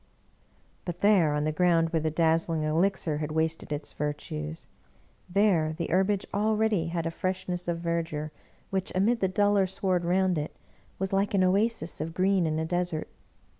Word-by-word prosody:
But 175 -1 -6
there, 185 -8 +4
on 150 - 0
the 155 - 0
ground 165 0 +2
where 165 - +1
the 155 0 0
dazzling 165 0 +1
elixir 160 -1 0
had 155 0 -3
wasted 160 0 -1
its 145 0 -4
virtues 80 - -4 0.3
— - - -34 0.3
there 175 -5 +2
the 170 - -3
herbage 190 +2 +2
already 215 -3 +1
had 165 0 -2
a 165 - -1
fresh 185 +2 -3
ness 180 0 -3
of 170 -1 0
verdure 165 -3 -2 0.4
which, 190 -1 -2
amid 220 +6 +2
the 190 - +2
duller 200 +1 +2
sward 185 -1 0
round 180 -1 +2
it, 150 - -5 0.4
was 190 +1 -3
like 200 +1 +1
an 190 - +4
oasis 190 -3 +1
of 165 +1 -5
green 185 -2 +2
in 155 0 -1
a 160 - -1
desert. 175 -2 -2
175 Hz, 175 wpm, -28 LUFS, 160-190 Hz, 0.4 s, there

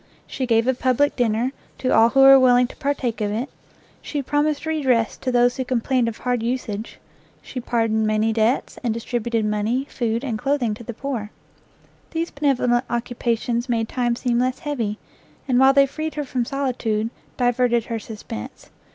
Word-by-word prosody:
She 260 - -4
gave 230 -1 +3
a 260 - +3
public 260 +3 +1
dinner 240 +1 +1 0.3
to 255 - 0
all 225 +1 +6
who 270 +3 +3
were 270 0 +9
willing 250 -1 +5
to 245 - -10
partake 270 -6 -2
of 205 -1 0
it, 235 +6 -2 0.5
she 290 -2 -4
promised 295 +2 0
redress 265 -8 +1
to 255 - -2
those 245 0 +3
who 260 - -1
complained 250 0 0
of 230 - -4
hard 245 -2 -1
usage, 230 -3 -3 0.4
she 255 - -7
pardoned 225 -2 0
many 215 +1 +1
debts, 225 +4 0
and 230 -2 0
distributed 230 -1 -2
money, 215 +5 0
food, 235 0 -1
and 230 -6 -3
clothing 270 -5 0
to 220 - -9
the 235 0 -7
poor. 245 -6 -4 0.8
These 335 0 -3
benevolent 255 -4 +1
occupations 235 0 -1
made 225 -2 0
time 240 -2 0
seem 240 -1 0
less 255 +1 0
heavy, 235 -8 -3 0.5
and 250 -2 +3
while 265 +1 +7
they 275 0 +5
freed 310 +3 -5
her 300 - -2
from 255 -3 -2
solitude, 235 -5 -1 0.3
diverted 245 -1 +2
her 230 -1 -3
suspense. 210 - -9
245 Hz, 175 wpm, -22 LUFS, 225-265 Hz, 0.8 s, were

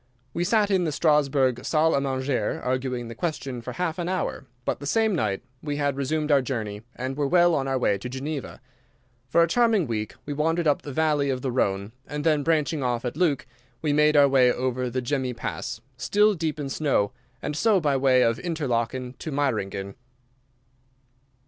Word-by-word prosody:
We 170 - -1
sat 205 +2 +2
in 190 -2 +3
the 160 - 0
Strasburg 140 -5 +2
salle 160 +1 +2
à 140 - +2
manger 130 -4 -1
arguing 125 -1 -1
the 115 - -7
question 135 -3 -4
for - - -6
half 180 -1 -2
an 175 0 -2
hour, 185 -7 -2 0.2
but - - -1
the 145 - -6
same 220 +5 +2
night 105 - -1 0.2
we 145 -1 -3
had 145 -2 0
resumed 150 +3 -1
our 140 -2 +5
journey 110 -6 -4
and 130 +2 -4
were 145 0 0
well 175 +2 +4
on 135 -3 0
our 135 -1 +1
way 100 -6 +1
to 125 - -6
Geneva. 135 +2 -5 0.7
For 170 +5 +5
a - - +2
charming 225 -1 +3
week 110 -3 -3
we 145 - -3
wandered 165 +3 0
up 145 -2 +2
the 145 - -7
Valley 150 -1 +1
of 130 -1 -2
the 130 - -1
Rhone, 100 -4 0 0.2
and 150 0 -4
then, 155 -2 +3
branching 155 -1 +1
off 125 -1 -1
at 125 - -3
Leuk, 160 -5 +1 0.4
we 150 -2 +1
made 150 0 +4
our 140 -1 +7
way 130 -2 +5
over 125 0 -1
the 125 +1 -2
Gemmi 130 -1 -1
Pass, - - -4 0.2
still 210 +1 +3
deep 160 -4 -3
in 145 - -3
snow, 135 -8 +1 0.3
and 150 - -4
so, 210 +4 +3
by 145 -5 +1
way 130 -1 +4
of 115 0 +1
Interlaken, 130 -6 -2
to 155 - -5
Meiringen. 100 -9 -1
140 Hz, 195 wpm, -25 LUFS, 125-155 Hz, 0.7 s, our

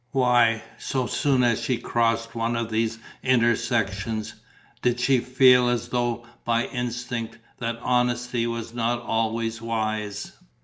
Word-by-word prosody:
Why, 120 -4 +3 0.2
so 130 -2 -1
soon 130 0 +1
as 120 -2 +2
she 125 - 0
crossed 115 -1 0
one 115 0 -1
of 115 -1 -2
these 115 +1 0 0.2
intersections, 115 -3 +1 0.5
did 125 0 +1
she 130 +1 +3
feel, 125 0 +5
as 120 0 -1
though 120 -1 -1 0.2
by 115 0 +1
instinct, 120 -2 -4 0.2
that 115 -1 -2
honesty 125 -1 +1
was 115 0 -4
not 120 0 0
always 115 0 -1
wise? 110 -2 -3
115 Hz, 130 wpm, -25 LUFS, 115-125 Hz, 0.5 s, feel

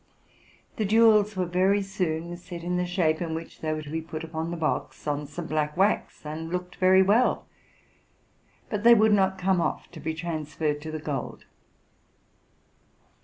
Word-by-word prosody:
The 215 - 0
jewels 215 -1 +5
were 185 - +1
very 190 +3 +2
soon 175 -3 -3
set, 175 -1 -9
in 180 +1 -1
the 180 0 -1
shape 175 -3 +1
in 165 -2 -2
which 165 0 -8
they 155 - -1
were 155 0 -3
to 145 - -10
be 160 +1 -2
put 160 0 -7
upon 160 0 -4
the 170 - -4
box, 160 -2 -2
on 145 -1 -2
some 160 +4 -6
black 150 0 -1
wax, 195 -4 0
and 160 +2 -5
looked 180 0 -4
very 190 +1 +5
well; 215 +6 +2 1.3
but 210 -2 -2
they 235 0 +8
would 215 -1 +4
not 190 -1 +2
come 185 -1 +1
off - - -3
to - - -10
be 160 - -3
transferred 155 -2 -3
to 155 +1 -6
the 155 - -3
gold. 145 -4 -5
175 Hz, 175 wpm, -26 LUFS, 155-190 Hz, 1.3 s, they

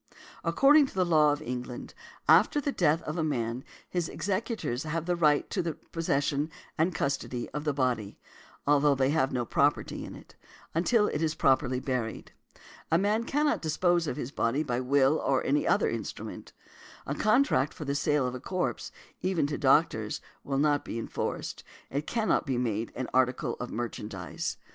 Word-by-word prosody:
According 275 - +5
to - - -13
the 185 -1 +2
law 155 -3 +5
of 145 +1 -3
England, 125 0 -5 0.3
after 295 - +5
the 285 0 -1
death 165 - +2
of 155 +2 -4
a - - +1
man, 120 -4 -2 0.2
his 175 -2 -2
executors 195 - -2
have 165 +1 -3
a 175 - +2
right 150 -4 +3
to 190 - 0
the 165 -2 -3
possession 145 -2 -1 0.3
and 165 +2 +1
custody 140 -4 -2
of 150 +2 -5
his 150 -3 0
body 125 -7 -1 0.5
(although 145 0 +4
they 135 +1 +2
have 140 -4 +2
no 125 -2 -1
property 140 +5 +1
in - - -8
it) - - -15 0.4
until 210 +7 +3
it 150 - -2
is 160 -1 0
properly 130 -3 +2
buried. 125 -4 -3 0.6
A 165 - +5
man 210 +5 +1
cannot 295 +3 +1
dispose 170 +1 +1
of 125 - -3
his 125 - -4
body 135 +3 0
by 125 -4 -1
will 135 +3 +3
or 135 -1 +1
any 145 +2 +1
other - - +3
instrument. - - -5 0.5
A 140 - -2
contract 215 - +3
for 150 - -8
the 140 - -1
sale 145 -1 +1
of 125 - -2
a 130 - -5
corpse, 180 +7 -3 0.3
even 185 -5 +1
to 145 0 -2
doctors, 135 -6 +2 0.2
will 135 -1 -2
not 145 0 +2
be - - -5
enforced; 115 - -4 0.3
it 145 +3 -2
cannot 220 -9 +1
be 130 -2 0
made 115 -2 -1
an 130 -1 -3
article 130 -1 +1
of 125 - -4
merchandise. 105 -7 -4
145 Hz, 175 wpm, -29 LUFS, 130-165 Hz, 0.6 s, According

